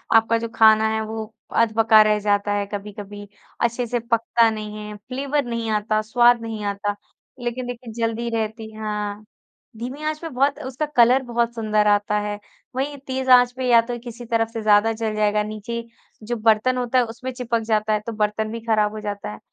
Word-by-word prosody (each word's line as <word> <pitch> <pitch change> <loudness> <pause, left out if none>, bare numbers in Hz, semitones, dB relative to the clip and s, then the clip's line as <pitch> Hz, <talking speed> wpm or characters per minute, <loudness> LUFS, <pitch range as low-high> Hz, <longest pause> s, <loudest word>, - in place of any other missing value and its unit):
आपका 225 +1 +4
जो 230 0 -3
खाना 220 0 +6
है 220 - -1
वो 220 0 -6 0.3
अधपका 220 -1 +5
रह 215 0 +3
जाता 205 0 +1
है 205 0 0
कभी-कभी, 205 0 -7 0.3
अच्छे 235 +1 0
से 240 +1 -1
पकता 230 0 +2
नहीं 215 -1 -5
है 210 - -7
फ्लेवर 270 +5 -2
नहीं 230 -1 -3
आता, 215 0 +1
स्वाद 240 +2 +4
नहीं 220 -2 -5
आता। 205 0 -2 0.4
लेकिन 245 +1 -3
देखिए 240 -1 -7
जल्दी 230 0 -2
रहती 220 0 -3
हाँ, 210 -1 -4 0.5
धीमी 255 +6 -6
आँच 310 0 -2
पे 330 - -5
बहुत 275 +2 +1
उसका 265 +4 -3
कलर 250 +3 +5
बहुत 235 -1 -1
सुंदर 215 -2 +1
आता 205 0 +2
है 205 0 -4 0.4
वही 280 +2 -2
तेज़ 260 0 -2
आँच 245 0 +7
पे 260 - -2
या 235 -1 +7
तो 240 +1 -5
किसी 240 0 -8
तरफ 225 -1 +1
से 225 - -3
ज़्यादा 215 +1 +4
जल 220 -1 -3
जाएगा 210 0 +2
नीचे 215 +2 -5 0.4
जो 240 +2 -3
बर्तन 225 +3 +2
होता 250 +1 0
है 250 - +5
उसमें 235 +3 -6
चिपक 240 -2 -1
जाता 215 -1 +1
है 210 - +2
तो - - -2
बर्तन 215 0 -1
भी 230 - -4
ख़राब 215 -2 +2
हो 215 - -6
जाता 205 - -5
है। 105 - -10
225 Hz, 195 wpm, -22 LUFS, 210-240 Hz, 0.5 s, आँच